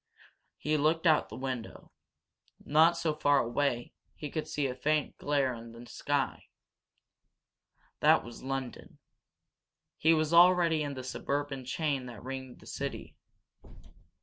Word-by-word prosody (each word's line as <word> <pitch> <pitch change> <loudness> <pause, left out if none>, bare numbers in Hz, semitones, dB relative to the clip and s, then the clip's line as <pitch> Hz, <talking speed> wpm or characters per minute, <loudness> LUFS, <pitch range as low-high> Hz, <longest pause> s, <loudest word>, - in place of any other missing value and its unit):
He 155 +1 0
looked 160 +3 +1
out 155 -2 +5
of - - -23
the - - -8
window. 130 -3 -6 0.7
Not 160 +3 +5
so 165 -2 0
far 145 -1 +3
away 120 0 0 0.2
he 150 -2 -7
could 155 - -3
see 145 - -1
a 130 - -1
faint 150 +4 0
glare 140 -3 +1
in 115 0 -10
the 115 +1 -11
sky. 140 +2 -2 1.5
That - - +5
was 120 0 -10
London. 135 -1 -5 1.0
He 165 +1 +5
was 155 +1 0
already 170 -2 +6
in 145 -2 -3
the 130 - -6
suburban 140 +1 -3
chain 140 -2 -1
that 115 -4 -10
ringed 130 -1 -6
the - - -22
great - - -12
city. - - -5
145 Hz, 145 wpm, -30 LUFS, 130-155 Hz, 1.5 s, already